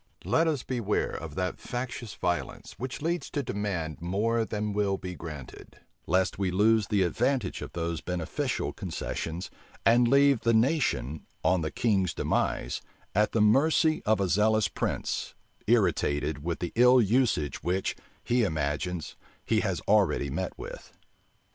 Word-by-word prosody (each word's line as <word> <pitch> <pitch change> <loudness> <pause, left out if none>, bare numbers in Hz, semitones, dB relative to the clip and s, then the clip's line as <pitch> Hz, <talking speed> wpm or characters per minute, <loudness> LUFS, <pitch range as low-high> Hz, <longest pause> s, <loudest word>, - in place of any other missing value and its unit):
Let 165 +1 +3
us 150 -6 0
beware 115 -5 -1
of 80 -2 -7
that 90 -1 -2
factious 120 -3 -5
violence, 90 -2 -3
which 130 +3 -5
leads 170 +2 -1
to 145 - -2
demand 90 - -3
more 110 +6 0
than 105 -1 -3
will 100 -1 +1
be 90 -1 -6
granted; 75 -6 -9 0.3
lest 95 +3 +1
we 95 -2 +1
lose 105 +3 +3
the 100 -2 +2
advantage 120 +4 0
of - - -7
those 85 -1 -2
beneficial 90 -3 -2
concessions, 80 +2 -4 0.3
and 120 +1 +5
leave 140 0 +5
the 115 0 +2
nation, 110 - +1 0.2
on 90 -1 +3
the 80 - -1
king's 100 -4 +1
demise, - - -1 0.3
at 105 +2 +2
the 115 - +1
mercy 155 +8 +4
of 110 0 +2
a 100 - +1
zealous 105 +3 +3
prince, - - -3 0.3
irritated 75 0 +1
with 85 0 -3
the 85 - -2
ill 125 +2 +6
usage 110 - +1
which, 90 +3 -1 0.3
he 120 +1 +2
imagines, 80 0 -2 0.3
he - - +2
has - - -1
already 70 -1 +2
met 90 +6 -3
with. - - -9
100 Hz, 150 wpm, -28 LUFS, 85-120 Hz, 0.3 s, ill